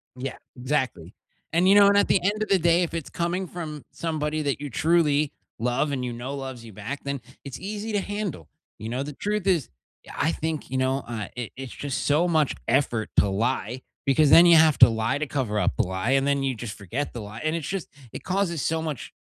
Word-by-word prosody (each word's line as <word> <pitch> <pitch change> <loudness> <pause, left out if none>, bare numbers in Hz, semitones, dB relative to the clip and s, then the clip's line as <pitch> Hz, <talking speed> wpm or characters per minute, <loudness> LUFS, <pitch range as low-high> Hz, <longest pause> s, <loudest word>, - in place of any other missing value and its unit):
Yeah, 130 +1 -5 0.2
exactly, 125 - -2 0.4
and, 175 +3 +3
you 195 - +7
know, 205 -1 +8
and 200 0 +5
at 205 - +4
the - - +4
end 205 +3 0
of - - -6
the 195 - +4
day, 170 +1 +4
if 170 - -4
it's 165 -4 -4
coming 175 +2 -2
from 155 -4 -7
somebody 155 -2 -2
that 140 -1 -1
you 145 - -4
truly 150 0 +2 0.3
love 125 +5 0
and 130 -2 -2
you 120 - -3
know 125 +4 -5
loves 130 -3 -6
you 110 - -11
back, 115 +8 -5
then 140 -2 -3 0.2
it's 135 -2 -7
easy 210 +2 -5
to 205 - +2
handle. 200 - -4 0.3
You 110 - -5
know, 125 +3 -2
the 150 - -6
truth 205 +5 -2
is, 170 -9 +2 0.5
I 160 - +1
think, 160 -1 -3
you 130 - -2
know, 130 +1 0
I 110 -3 -5
it 120 -3 -5
it's 135 -1 -7
just 140 -2 -3
so 155 +5 +3
much 155 -4 +2
effort 120 -4 +1
to 100 - +5
lie 120 +4 -1 0.2
because 140 +2 +4
then 170 +4 +9
you 170 - +8
have 160 -2 +5
to 125 - +10
lie 115 +4 0
to 155 - -2
cover 120 -7 -1
up - - +1
the 120 - +3
lie, 95 +5 -2
and 135 0 +3
then 140 -1 +1
you 135 -2 0
just 110 -1 -7
forget 115 +9 -4
the 120 - -5
lie, 105 +2 -8
and 155 +1 0
it's 165 -4 -4
just 195 -3 -3 0.3
it - - -7
causes 185 -4 -1
so 160 +3 0
much 155 -6 -5
140 Hz, 235 wpm, -25 LUFS, 125-170 Hz, 0.5 s, to